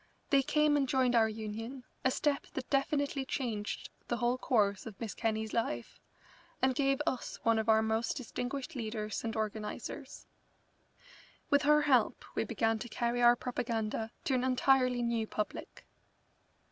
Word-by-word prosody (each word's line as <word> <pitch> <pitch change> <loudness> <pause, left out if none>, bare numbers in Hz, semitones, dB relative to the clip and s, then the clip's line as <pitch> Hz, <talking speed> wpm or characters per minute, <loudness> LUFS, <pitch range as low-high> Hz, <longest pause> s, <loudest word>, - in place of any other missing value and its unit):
They 275 -1 +6
came 295 +1 +3
and 270 -2 +1
joined 260 -2 +3
our 225 -2 +5
Union, 225 +4 -6 0.2
a 260 - +4
step 285 +2 0
that 255 - -5
definitely 280 0 +1
changed 230 -6 -3 0.2
the 240 - -1
whole 240 +1 +2
course 205 -5 +1
of 210 -3 -9
Miss 220 -5 -4
Kenney's 220 -1 -2
life, 120 - -2 0.6
and 260 0 +3
gave 275 +1 +2
us 255 - -2
one 230 -1 +3
of 220 +1 -1
our 220 0 +5
most 220 +3 0
distinguished 255 +1 -4
leaders 215 -3 -3
and 225 -1 -3
organisers. 215 -1 -5 1.3
With 285 0 +5
her 300 +1 +5
help 255 -7 +2
we - - 0
began 225 -1 0
to 240 - -6
carry 240 +2 -1
our 240 0 +7
propaganda 225 -3 -2
to 270 - 0
an 255 -1 +2
entirely 255 -1 +3
new 230 -2 0
public. 210 -1 -5
240 Hz, 155 wpm, -32 LUFS, 220-265 Hz, 1.3 s, our